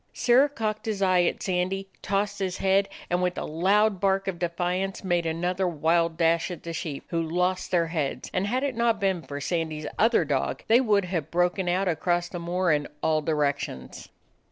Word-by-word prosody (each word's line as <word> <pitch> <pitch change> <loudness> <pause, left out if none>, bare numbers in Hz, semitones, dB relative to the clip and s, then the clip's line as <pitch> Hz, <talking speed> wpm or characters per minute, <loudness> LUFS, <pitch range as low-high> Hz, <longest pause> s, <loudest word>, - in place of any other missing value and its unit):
Sirrah 255 +4 +4
cocked 215 -5 -3
his 205 -3 -1
eye 185 -1 +4
at - - -2
Sandy, 190 +1 -1
tossed 200 +1 -1
his 185 -2 -2
head, 195 +1 +2 0.2
and, 175 +1 +1
with 180 0 0
a - - -3
loud 195 +5 +2
bark 195 0 +1
of 180 -3 -3
defiance, 180 +3 -2
made 175 -3 0
another 180 +3 -1
wild 165 0 +1
dash 165 +1 +2
at 175 - -7
the 170 - -5
sheep, 150 -4 -5
who 165 -1 0
lost 180 +3 -1
their 170 -2 +2
heads, 160 -4 -3
and 185 +2 0
had 255 +5 0
it 280 -2 0
not 235 -1 +2
been 190 -3 0
for 145 -2 -7
Sandy's 155 -1 -2
other 225 -6 +4
dog, 140 -2 -1
they 235 +3 +5
would 205 -6 +2
have 175 -5 -3
broken 180 +1 +1
out 185 +2 +1
across 175 +1 0
the 175 - -6
moor 175 +1 0
in 145 -1 +1 0.2
all 155 -1 +2
directions. 145 - -2
180 Hz, 195 wpm, -26 LUFS, 165-195 Hz, 0.2 s, they